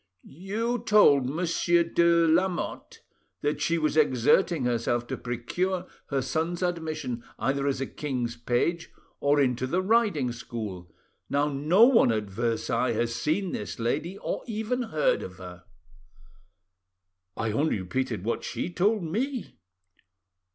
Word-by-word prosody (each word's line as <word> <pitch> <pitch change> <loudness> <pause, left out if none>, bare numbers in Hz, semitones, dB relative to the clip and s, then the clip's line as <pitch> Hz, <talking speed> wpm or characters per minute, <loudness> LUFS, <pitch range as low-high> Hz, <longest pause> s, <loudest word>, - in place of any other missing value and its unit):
"You 215 - -3
told 205 - +5
Monsieur 170 +2 +2
de, 170 0 +3
Lamotte 175 +3 -1 0.4
that 145 0 -1
she 170 +2 +1
was 155 -2 0
exerting 150 +2 +3
herself 120 0 0
to - - -4
procure 175 +11 -2 0.2
her 135 -2 -1
son's 165 +6 -2
admission 155 -9 -3
either 140 +1 0
as 135 -2 0
a - - 0
king's 125 -5 -3
page 125 +9 -1 0.3
or 145 +1 +3
into 130 -2 +1
the 175 +7 0
riding 200 - +2
school. 105 -8 -7 0.4
Now, 145 +1 +1
no 150 +9 +3
one 235 - +5
at 110 -1 0
Versailles 115 +3 0
has 115 +1 -1
seen 170 +9 -1
this 105 - -5
lady, 150 +11 -2
or - - -3
even 225 +3 -2
heard 155 -11 +1
of 90 - -8
her." 90 -1 -11 1.7
"I 110 -1 -1
only 140 0 +1
repeated 110 +2 -3
what 115 - -2
she 175 - -4
told 205 +3 +1
me." 240 - -3
150 Hz, 135 wpm, -27 LUFS, 120-175 Hz, 1.7 s, told